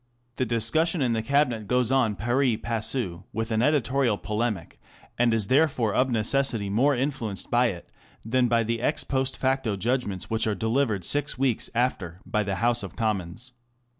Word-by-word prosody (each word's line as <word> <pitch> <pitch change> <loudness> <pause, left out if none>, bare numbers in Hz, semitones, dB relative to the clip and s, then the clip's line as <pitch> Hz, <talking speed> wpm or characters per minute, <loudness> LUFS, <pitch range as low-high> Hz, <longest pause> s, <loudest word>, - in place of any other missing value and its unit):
The 130 - 0
discussion 140 +8 +1
in 120 -2 +1
the 110 - 0
Cabinet 120 -3 +1
goes 125 +1 +1
on 125 -6 +2
pari 120 +2 +1
passu 110 -6 -3
with 110 +1 -3
the 110 -1 +1
editorial 135 -5 +2
polemic, 105 -5 -3 0.4
and 120 -1 +4
is 110 -3 +1
therefore 130 -6 +2
of 130 +1 +2
necessity 115 -2 +1
more 135 +7 +3
influenced 120 -6 -3
by 120 +1 +4
it 90 -6 -6 0.4
than 125 +2 +2
by 115 -1 +2
the 115 +1 -2
ex 145 - 0
post 130 -1 -2
facto 130 -5 0
judgments 105 -2 -2
which 110 0 0
are 105 - 0
delivered 110 -1 0
six 145 0 +1
weeks 130 -4 0
after 100 -8 -1
by 105 - 0
the 100 -2 -2
House 120 +5 +2
of - - -8
Commons. 110 +1 -3
115 Hz, 170 wpm, -26 LUFS, 110-130 Hz, 0.4 s, and